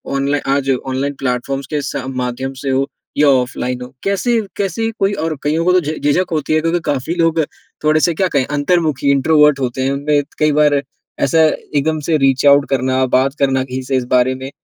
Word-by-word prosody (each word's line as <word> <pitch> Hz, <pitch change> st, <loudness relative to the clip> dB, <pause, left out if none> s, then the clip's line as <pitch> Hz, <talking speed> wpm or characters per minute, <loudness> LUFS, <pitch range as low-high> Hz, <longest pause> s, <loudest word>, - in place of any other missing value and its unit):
online 140 Hz, 0 st, -1 dB
आज 140 Hz, -1 st, -1 dB, 0.2 s
online 135 Hz, +2 st, -2 dB
platforms 135 Hz, +1 st, -2 dB
के 150 Hz, -, 0 dB
स 140 Hz, -1 st, -4 dB
माध्यम 130 Hz, 0 st, -3 dB
से 140 Hz, -, -3 dB
हो 135 Hz, +1 st, +1 dB, 0.3 s
या 150 Hz, -, +4 dB
ऑफलाइन 125 Hz, -1 st, 0 dB
हो, 125 Hz, +1 st, -9 dB
कैसे 225 Hz, +4 st, +1 dB, 0.2 s
कैसे 205 Hz, +3 st, -1 dB
कोई 195 Hz, +1 st, +1 dB
और 160 Hz, -3 st, -2 dB
कइयों 155 Hz, +3 st, 0 dB
को 180 Hz, -, +4 dB
तो 185 Hz, -, +5 dB
झि 155 Hz, 0 st, -4 dB
झिझक 175 Hz, +6 st, +1 dB
होती 155 Hz, -1 st, -1 dB
है 155 Hz, -, +3 dB
क्योंकि 165 Hz, +2 st, 0 dB
काफ़ी 145 Hz, +4 st, -2 dB
लोग 165 Hz, -1 st, +1 dB, 0.4 s
थोड़े 155 Hz, 0 st, +3 dB
से 170 Hz, -, +2 dB
क्या 190 Hz, +4 st, 0 dB
कहें 140 Hz, -3 st, +2 dB
अंतर्मुखी 145 Hz, 0 st, 0 dB
इंट्रोवर्ट 150 Hz, +1 st, +4 dB
होते 130 Hz, 0 st, -2 dB
हैं 135 Hz, -, 0 dB
उनमें 145 Hz, +1 st, +1 dB, 0.2 s
कई 155 Hz, 0 st, +3 dB
बार 150 Hz, 0 st, +3 dB
ए 140 Hz, -, +1 dB, 0.4 s
ऐसा 165 Hz, -, +2 dB, 0.4 s
एकदम 155 Hz, +2 st, +1 dB
से 155 Hz, +2 st, 0 dB
रीच 135 Hz, -1 st, +2 dB
आउट 140 Hz, 0 st, +6 dB
करना, 130 Hz, 0 st, +1 dB
बात 130 Hz, +2 st, +1 dB
करना 135 Hz, -1 st, +2 dB
किसी 130 Hz, 0 st, -5 dB
से 130 Hz, +1 st, -1 dB
इस 125 Hz, -, -2 dB
बारे 125 Hz, +1 st, +3 dB
में, 130 Hz, +1 st, -7 dB
140 Hz, 210 wpm, -17 LUFS, 130-155 Hz, 0.4 s, आउट